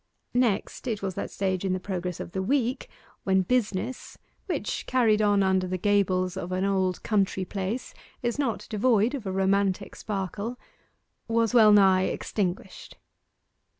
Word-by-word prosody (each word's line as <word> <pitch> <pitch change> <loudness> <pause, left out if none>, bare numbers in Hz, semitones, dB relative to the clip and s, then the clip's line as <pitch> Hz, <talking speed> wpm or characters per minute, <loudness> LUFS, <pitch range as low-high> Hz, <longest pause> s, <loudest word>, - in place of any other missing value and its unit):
Next, 245 0 0
it 215 -4 -2
was 190 -1 -2
that - - -4
stage 190 -2 -2
in 190 -1 0
the 185 - -1
progress 180 -2 -4
of - - -6
the 190 - -2
week 255 +4 0 0.3
when 190 -1 +2
business 235 +2 -2 0.3
which, - - -3
carried 225 -4 +3
on 205 -1 +3
under 190 -1 +2
the 185 0 -2
gables 185 -2 +1
of 185 -1 -5
an 185 +1 0
old 190 -2 0
country 195 -3 0
place, 200 +6 -4 0.3
is 240 +3 -1
not 255 -6 -1
devoid 225 +2 +2
of 250 -8 -5
a - - -1
romantic 195 +1 0
sparkle 210 +4 -4 0.7
was 230 0 +1
well 220 -3 +7
nigh 190 -2 +5
extinguished. 190 -3 -4
200 Hz, 150 wpm, -27 LUFS, 190-225 Hz, 0.7 s, well